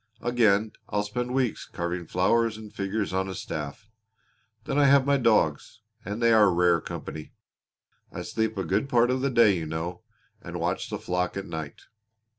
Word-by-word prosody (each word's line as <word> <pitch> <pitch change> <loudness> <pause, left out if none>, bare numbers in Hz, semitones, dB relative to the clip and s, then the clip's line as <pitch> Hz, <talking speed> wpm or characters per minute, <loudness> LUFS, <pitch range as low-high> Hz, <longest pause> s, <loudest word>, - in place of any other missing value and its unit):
Again 110 -3 +3 0.2
I'll 105 0 0
spend 125 +4 -3
weeks 130 -3 -1
carving 85 0 -4
flowers 110 +5 +2
and 110 -1 -11
figures 100 0 -2
on 95 0 -1
a 95 - -5
staff. 75 +7 -6 0.8
Then 145 0 0
I 145 - +5
have 140 -1 +5
my 140 0 +3
dogs, 110 - +1 0.2
and 105 +3 -4
they 115 0 +5
are 105 -3 +6
rare 85 -1 +3
company. 75 -1 -7 0.8
I - - -6
sleep 110 -1 -2
a 95 - -2
good 105 +8 0
part 120 0 +3
of 130 0 0
the 140 - +1
day, 115 -5 +5
you 80 -3 -4
know, 85 +3 -4 0.4
and - - -6
watch - - -2
the - - -3
flock 90 +1 -2
at 100 - -4
night." 80 -5 -6
105 Hz, 180 wpm, -26 LUFS, 90-120 Hz, 0.8 s, are